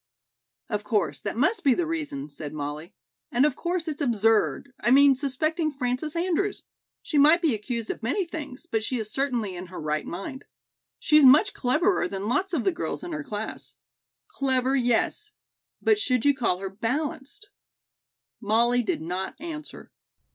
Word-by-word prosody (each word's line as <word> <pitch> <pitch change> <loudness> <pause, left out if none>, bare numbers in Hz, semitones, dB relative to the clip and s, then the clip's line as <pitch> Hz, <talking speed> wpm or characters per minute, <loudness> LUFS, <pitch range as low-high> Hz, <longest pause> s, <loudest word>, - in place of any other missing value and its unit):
"Of 210 0 -2
course 210 -5 0
that 200 - -4
must 370 - +2
be 270 -4 +4
the 350 - 0
reason," 295 -3 -4
said 150 - -8
Molly, 150 +3 -6 0.4
"and 250 +4 +4
of 295 - +1
course 345 0 -2
it's 305 -1 -4
absurd, 225 +2 +1
I - - +1
mean 275 +2 +7
suspecting 310 +5 0
Frances 270 +2 -2
Andrews. 370 +3 0 0.4
She 300 - +1
might 305 +4 +7
be 325 -7 +2
accused 225 +1 -3
of - - -8
many 285 - 0
things, 295 -4 -7
but 225 -10 -1
she 255 +3 -1
is 215 -2 -5
certainly 240 -7 -1
in 180 +1 -7
her 180 - -8
right 150 0 -2
mind. 195 +9 -6 0.5
She's 305 -1 +4
much 295 +10 +7
cleverer 315 +10 +1
than 195 +1 -4
lots 365 - 0
of 310 -9 0
the - - +2
girls 340 - -3
in 350 - -6
her 305 -1 -4
class." 175 - -5 0.5
"Clever, 260 -1 0
yes. 260 - 0 0.5
But 430 -1 +4
should 255 - +1
you 285 - +6
call 235 -9 0
her 195 +1 -5
balanced?" 280 - -2 0.9
Molly 235 +4 +3
did 210 -8 -2
not 180 +3 -3
answer. 310 -1 -8
265 Hz, 170 wpm, -26 LUFS, 220-310 Hz, 0.9 s, mean